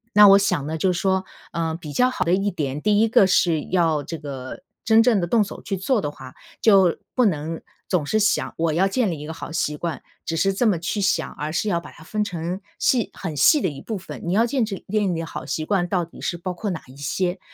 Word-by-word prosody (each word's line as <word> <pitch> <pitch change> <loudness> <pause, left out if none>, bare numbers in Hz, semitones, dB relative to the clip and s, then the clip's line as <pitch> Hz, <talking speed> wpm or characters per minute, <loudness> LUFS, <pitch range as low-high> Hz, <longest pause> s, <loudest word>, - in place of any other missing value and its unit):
那 210 0 +9
我 195 0 +9
想 180 -7 0
呢 160 - -3
就 185 +3 +2
是 170 - -2
说， 190 -1 +1 0.3
呃， 165 -1 -2
比 160 -3 -8
较 250 0 +3
好 220 -8 -2
的 170 - +2
一 195 +2 +1
点， 150 -4 -3
第 210 0 +3
一 225 - +4
个 210 -3 +5
是 170 -4 +3
要 165 -5 +1
这 165 - -6
个 140 - -8 0.2
真 225 0 +6
正 230 -4 +3
地 175 - -1
动 215 +4 +3
手 200 - -8
去 195 - -3
做 220 +5 +1
的 145 -4 -3
话， 130 -2 -12 0.3
就 195 -6 +5 0.2
不 250 - +4
能 165 -3 -1 0.3
总 170 -6 0
是 215 - +1
想 210 0 +1
“我 165 -1 +1
要 190 +4 +3
建 215 -2 0
立 160 - -5
一 150 - -7
个 160 - -5
好 165 - -8
习 150 -2 -1
惯”， 170 +1 -4 0.2
只 165 - -2
是 195 +3 +2
这 240 - 0
么 180 -6 +2
去 200 +5 -2
想， 195 0 +1
而 150 +1 -4
是 195 +6 -1
要 170 -3 +1
把 - - -12
它 160 - -15
分 210 +5 -1
成 180 0 -4 0.2
细 250 -5 +2
很 165 -6 -5
细 275 - +5
的 185 - +1
一 140 -2 -9
部 220 -3 -4
分。 185 - -9
你 170 - -1
要 225 +4 +4
建 245 0 0
制 200 -3 -6
建 205 -3 +1
立 165 - -3
好 165 - -7
习 155 - -3
惯 175 -1 +1
到 180 -1 0
底 170 - -14
是 175 - -2
包 180 +1 -4
括 205 +4 -4
哪 175 -5 -4
一 130 - -14
些？ 175 +6 -2
180 Hz, 280 characters per minute, -23 LUFS, 160-205 Hz, 0.3 s, 那